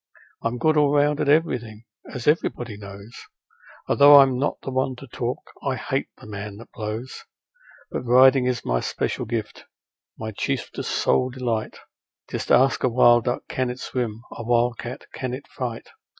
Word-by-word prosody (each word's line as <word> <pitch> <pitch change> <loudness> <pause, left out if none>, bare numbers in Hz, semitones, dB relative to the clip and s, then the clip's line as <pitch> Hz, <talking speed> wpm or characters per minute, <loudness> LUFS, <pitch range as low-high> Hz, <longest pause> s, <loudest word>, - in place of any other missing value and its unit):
I'm 115 +1 -2
good 155 +4 +2
all 145 -1 +4
round 145 0 +3
at - - 0
everything, 120 -8 +1 0.3
as 125 - -6
everybody 120 -7 0
knows, 100 +1 -11 0.8
Although 145 0 +8
I'm 135 -2 +4
not 145 - -1
the 135 - -4
one 130 0 0
to 130 - -11
talk 125 -1 -5
I - - -1
HATE - - -2
a - - -14
man 100 -1 -7
that 115 - -13
blows. 110 +3 -6 0.7
But - - -3
riding 130 +1 +6
is 125 -1 -2
my - - +1
special - - -2
gift, 110 -2 -4 0.5
my 110 0 -5
chiefest, 100 - -3
sole 130 - +2
delight; 120 -4 -3 0.5
Just - - -3
ask 130 +2 +4
a 130 - +3
wild 120 -1 +5
duck 125 - -1
can 130 -1 -1
it 125 +1 -6
swim, 115 -4 -4
a - - -7
wild 120 0 +1
cat 120 - -7
can 130 -1 -3
it 140 - -11
fight. 120 -4 -6
125 Hz, 170 wpm, -23 LUFS, 115-130 Hz, 0.8 s, Although